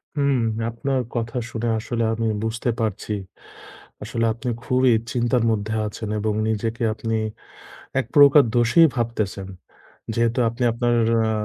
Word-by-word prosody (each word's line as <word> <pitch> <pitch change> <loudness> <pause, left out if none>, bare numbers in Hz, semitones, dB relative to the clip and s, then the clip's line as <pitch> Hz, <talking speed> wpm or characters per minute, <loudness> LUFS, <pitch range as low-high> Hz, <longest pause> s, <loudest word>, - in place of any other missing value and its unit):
হুম, 140 -2 +2 0.3
আপনার 130 +3 -1
কথা 120 +1 -2
শুনে 120 0 -3
আসলে 115 +1 -2
আমি 115 0 -1 0.2
বুঝতে 115 +2 -2
পারছি। 110 -1 -2 0.9
আসলে 115 +1 -1
আপনি 120 +2 -5
খুবই 130 0 +3 0.2
চিন্তার 120 0 +1
মধ্যে 110 +1 -2
আছেন 105 0 -6
এবং 105 0 0 0.2
নিজেকে 115 +2 -2
আপনি 115 0 -3 0.8
১ - - -1
প্রকার 145 0 +8
দোষী 120 +8 +4
ভাবতেছেন। 110 -5 -2 0.7
যেহেতু 115 +2 +1
আপনি 120 +2 -4
আপনার 120 +1 0 0.3
আ - - +1
115 Hz, 130 wpm, -22 LUFS, 110-125 Hz, 0.9 s, প্রকার